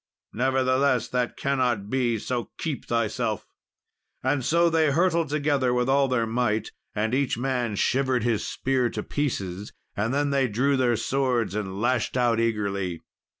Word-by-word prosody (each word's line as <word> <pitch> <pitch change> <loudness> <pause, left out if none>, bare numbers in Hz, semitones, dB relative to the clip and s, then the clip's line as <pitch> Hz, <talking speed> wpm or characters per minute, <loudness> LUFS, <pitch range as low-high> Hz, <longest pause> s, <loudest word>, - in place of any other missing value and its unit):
Nevertheless, 130 0 +2
that 125 -1 -1
cannot 125 -7 0
be, 120 -1 +1
so 120 +2 -3
keep 155 -5 -4
thyself." 115 -2 -1 0.8
And 130 0 +1
so 170 +6 +3
they 160 -2 +3
hurtled 170 +1 +2
together 145 -4 +1
with 125 0 +1
all 135 +1 +3
their 125 -3 +1
might, 110 -2 -1 0.2
and 110 +2 0
each 135 -3 +1
man 125 -3 -1
shivered 130 +2 +1
his 115 -3 +1
spear 130 -2 0
to - - -4
pieces; 100 -9 -3 0.2
and 110 +3 -1
then 145 +1 +1
they 135 -2 +2
drew 130 +6 +1
their 125 -2 +2
swords 125 -7 0
and 100 -2 -4
lashed 120 +1 0
out 120 -2 +2
eagerly. 100 -6 -1
125 Hz, 150 wpm, -25 LUFS, 115-135 Hz, 0.8 s, so